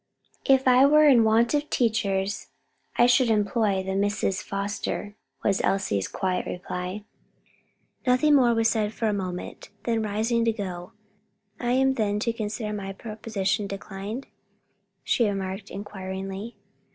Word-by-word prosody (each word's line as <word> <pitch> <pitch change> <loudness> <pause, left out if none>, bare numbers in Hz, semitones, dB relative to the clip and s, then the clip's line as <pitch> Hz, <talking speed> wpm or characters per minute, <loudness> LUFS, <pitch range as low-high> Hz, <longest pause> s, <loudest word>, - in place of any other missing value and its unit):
"If 265 -1 +4
I 255 +1 +7
were 300 +1 +6
in 250 -5 +6
want 225 +3 +3
of 295 0 0
teachers, 205 -4 0 0.5
I 240 - +5
should 245 0 +4
employ 210 -2 +1
the 190 0 -3
Misses 200 -1 0
Foster," 205 +1 -4 0.3
was 195 -1 +2
Elsie's 105 - 0
quiet 185 -1 -2
reply. 180 +3 -5 1.0
Nothing 255 +4 +4
more 245 -4 +5
was 225 0 +3
said 215 -1 0
for 230 - -2
a 210 - +1
moment, 185 -3 -5
then 230 -2 0
rising 220 +3 0
to 230 - +3
go, 185 -5 -6 0.7
"I 240 0 0
am 265 +1 +3
then 210 -5 0
to 230 0 0
consider 215 -1 -4
my 195 -1 -5
proposition 210 -1 -2
declined?" 200 +5 -6 0.8
she 235 - +2
remarked, 195 +1 -4
inquiringly. 195 +2 -6
210 Hz, 140 wpm, -26 LUFS, 195-235 Hz, 1.0 s, I